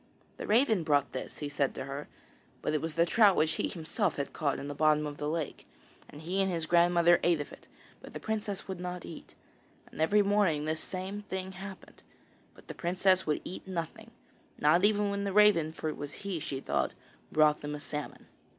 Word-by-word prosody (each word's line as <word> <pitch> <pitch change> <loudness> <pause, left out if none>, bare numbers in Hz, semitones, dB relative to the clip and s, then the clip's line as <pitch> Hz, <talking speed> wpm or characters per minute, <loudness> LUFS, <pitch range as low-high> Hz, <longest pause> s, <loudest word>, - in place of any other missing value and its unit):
'The - - -6
raven 220 -3 +4
brought 145 -3 +2
this,' 130 - -6
he 150 - -4
said 140 -1 -1
to 130 - -5
her. 140 +2 -6 0.6
But - - 0
it 155 - +1
was 160 -1 -4
the 170 0 +4
trout 205 +1 +5
which 155 +1 +3
he - - -1
himself 175 +2 -1
had 140 - -4
caught 145 -4 0
in 140 - -6
the 145 - -4
bottom 150 +1 +3
of 145 -1 -5
the 150 - -2
lake; 160 -2 -4 0.4
and 145 - -11
he 180 +5 -1
and 190 -1 +1
his 165 -2 -1
grandmother 175 0 +5
ate 170 -2 +3
of 145 - -5
it, - - -15 0.3
but - - -12
the - - -4
princess 210 -3 -3
would 190 -2 -5
not 180 0 -5
eat. 165 - -11 0.6
And - - -6
every 205 +6 +4
morning 195 -7 +2
this 155 0 -1
same 190 +2 -5
thing 190 -2 -5
happened, 190 0 -10 0.5
but - - -18
the - - -6
princess 185 +1 +2
would 150 - 0
eat 185 - -8
nothing, 185 +5 -5 0.5
not 165 +5 +4
even 205 -1 +3
when 200 0 -2
the 200 -1 -2
raven 205 -7 +5
for 160 - -5
it - - -5
was 145 0 -6
he, 190 -4 -2
she 135 -2 -4
thought 65 - -1 0.4
brought 155 -1 +4
them 150 0 -4
a - - -6
salmon. 150 0 -6
170 Hz, 215 wpm, -30 LUFS, 150-195 Hz, 0.6 s, trout